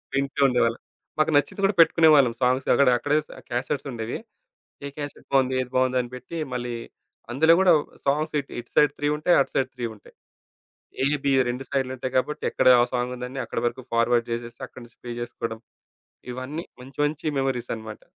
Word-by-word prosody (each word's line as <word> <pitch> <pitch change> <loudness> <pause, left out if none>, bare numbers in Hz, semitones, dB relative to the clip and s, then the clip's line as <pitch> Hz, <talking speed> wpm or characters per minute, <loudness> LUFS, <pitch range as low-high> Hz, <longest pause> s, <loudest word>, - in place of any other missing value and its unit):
వింటూ 140 +1 -1
ఉండేవాళ్ళం. 120 -2 +1 0.4
మాకు 155 +1 +3
నచ్చింది 145 +7 +1
గూడా 195 0 +3
పెట్టుకునేవాళ్ళం. 155 -6 +6
సాంగ్స్ 130 +1 +1
అక్కడ 140 - +4
అక్కడే 145 +5 +1
స్ - - -32 0.2
క్యాసెట్స్ 135 +4 -2
ఉండేవి. 115 -1 -4 0.7
ఏ - - -3
క్యాసెట్ 145 -1 -7
బావుంది? 130 -1 +3
ఏది 125 - -6
బావుంది? 130 0 +2
అని 120 - -8
పెట్టి 125 +7 -8 0.2
మళ్ళీ 120 -1 -3 0.6
అందులో 160 +6 +5
గూడా 190 -1 +5 0.3
సాంగ్స్ 150 +3 0
ఇటు, 140 - -8
ఇటు 120 - -11
సైడ్ 150 -1 +5
3 145 - -1
ఉంటాయి. 175 +4 +3
అటు - - -2
సైడ్ 130 -1 +1
3 125 -2 -3
ఉంటాయి. 105 - -19 0.9
ఏ - - +2 0.2
బి 140 - +3 0.2
2 125 +2 -3
సైడ్‌లుంటాయి 130 -1 -2
గాబట్టి 150 +4 -1
ఎక్కడ - - +3
ఆ - - +6
సాంగ్ 125 0 -1
ఉందని 125 +2 -6
అక్కడి 115 - -4
వరకు 120 +2 -3
ఫార్వర్డ్ 115 0 +2
జేసేసి 120 0 -5
అక్కడి 130 - -13
నుంచి 120 -1 -20
ప్లే 120 - -6
జేసుకోవడం, 115 -1 -5 0.7
ఇవన్నీ 140 +7 -5 0.2
మంచి 135 +2 -14
మంచి 150 +2 -4
మెమోరీసనమాట. 120 -5 -3
130 Hz, 175 wpm, -25 LUFS, 120-145 Hz, 0.9 s, పెట్టుకునేవాళ్ళం